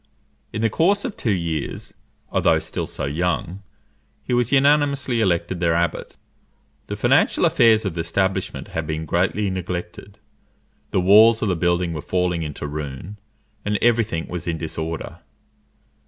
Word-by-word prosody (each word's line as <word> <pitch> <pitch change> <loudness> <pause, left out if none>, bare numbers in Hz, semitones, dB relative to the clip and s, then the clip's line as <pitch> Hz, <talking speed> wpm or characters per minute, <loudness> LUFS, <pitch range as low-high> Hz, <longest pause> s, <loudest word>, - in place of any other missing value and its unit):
In 110 - -3
the 115 - +3
course 200 - +2
of 240 - -4
two 115 - -3
years, 85 -6 -3 0.4
although - - +3
still - - -4
so - - -5
young, 90 +5 -2 0.6
he - - -3
was 120 -1 +1
unanimously 140 -3 +3
elected 85 -2 0
their 85 -2 +2
abbot. 85 -1 -2 0.7
The - - -4
financial - - +3
affairs 110 -2 +4
of 95 - -2
the 85 - -2
establishment 95 +2 -2
had 80 -1 -4
been 80 +1 -3
greatly 95 +5 0
neglected, 90 +2 -6 0.7
the 95 - +1
walls 110 +5 +6
of 105 - +1
the 90 - +1
building 85 0 0
were 75 - -4
falling 90 +1 -1
into 75 -1 -5
ruin, 75 +6 -6 0.4
and 105 0 0
every 120 0 +3
thing 80 -6 -4
was 90 -1 -6
in 85 -1 -1
disorder. 80 0 -5
90 Hz, 155 wpm, -22 LUFS, 85-110 Hz, 0.7 s, walls